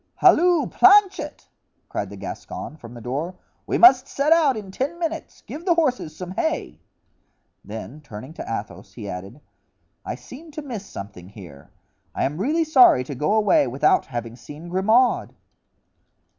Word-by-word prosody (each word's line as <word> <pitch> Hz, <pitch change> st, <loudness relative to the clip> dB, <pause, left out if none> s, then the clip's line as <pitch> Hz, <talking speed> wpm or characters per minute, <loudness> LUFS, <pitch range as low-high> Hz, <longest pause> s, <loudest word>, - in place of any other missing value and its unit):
"Halloo, 350 Hz, -3 st, +4 dB
Planchet!" 400 Hz, +1 st, +3 dB, 0.4 s
cried -, -, -4 dB
the -, -, -9 dB
Gascon -, -, -7 dB
from 120 Hz, -6 st, -12 dB
the 120 Hz, -, -10 dB
door, 145 Hz, +10 st, -4 dB, 0.3 s
"we -, -, 0 dB
must 270 Hz, -7 st, +7 dB
set 290 Hz, +3 st, +2 dB
out 300 Hz, -7 st, +3 dB
in 200 Hz, -3 st, -8 dB
ten 280 Hz, -, -3 dB
minutes; 330 Hz, -1 st, -5 dB
give 310 Hz, -, -8 dB
the 345 Hz, -2 st, +2 dB
horses 255 Hz, -, 0 dB
some 180 Hz, +1 st, -7 dB
hay." 320 Hz, -, -2 dB, 0.8 s
Then 155 Hz, -, -8 dB
turning 130 Hz, +1 st, -10 dB
to -, -, -7 dB
Athos 110 Hz, -2 st, -6 dB
he 110 Hz, -4 st, -8 dB
added: 95 Hz, +9 st, -8 dB, 0.6 s
"I -, -, -4 dB
seem 315 Hz, +6 st, -12 dB
to 305 Hz, 0 st, -6 dB
miss 225 Hz, -8 st, -7 dB
something 95 Hz, -2 st, -9 dB
here. 85 Hz, -9 st, -13 dB, 0.5 s
I -, -, -1 dB
am 150 Hz, +4 st, -2 dB
really 305 Hz, -, +1 dB
sorry 260 Hz, -, +6 dB
to 140 Hz, -, -7 dB
go 150 Hz, +9 st, 0 dB
away 210 Hz, -10 st, +3 dB
without 135 Hz, +5 st, +2 dB
having 120 Hz, -2 st, -5 dB
seen 150 Hz, +7 st, -11 dB
Grimaud." 220 Hz, +8 st, +2 dB
190 Hz, 155 wpm, -23 LUFS, -, 0.8 s, must